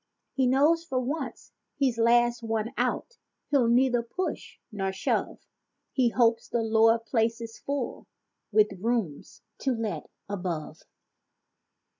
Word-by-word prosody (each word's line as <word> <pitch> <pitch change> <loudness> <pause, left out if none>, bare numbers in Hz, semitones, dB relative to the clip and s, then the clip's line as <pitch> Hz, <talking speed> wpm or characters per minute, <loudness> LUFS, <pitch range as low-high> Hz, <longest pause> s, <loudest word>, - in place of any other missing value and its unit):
He 265 -2 +2
knows 295 +6 +4
for 265 -6 -1
once 265 -1 -4 0.2
he's 260 -5 +1
last 240 +1 +4
one 225 +1 -2
out, - - -2 0.3
he'll 270 -5 +4
neither 245 0 +3
push 355 +11 -5
nor 195 -2 -2
shove— 190 - -2 0.5
He 255 -3 +2
hopes 230 -1 +2
the 235 - -1
lower 225 +1 +4
place 230 0 0
is 230 -1 -8
full, 280 -3 -4 0.4
with 210 -2 +3
"rooms 220 -10 -2 0.2
to 265 -2 0
let" 210 -9 -4 0.2
above. 180 -6 -4
235 Hz, 125 wpm, -27 LUFS, 220-255 Hz, 0.5 s, knows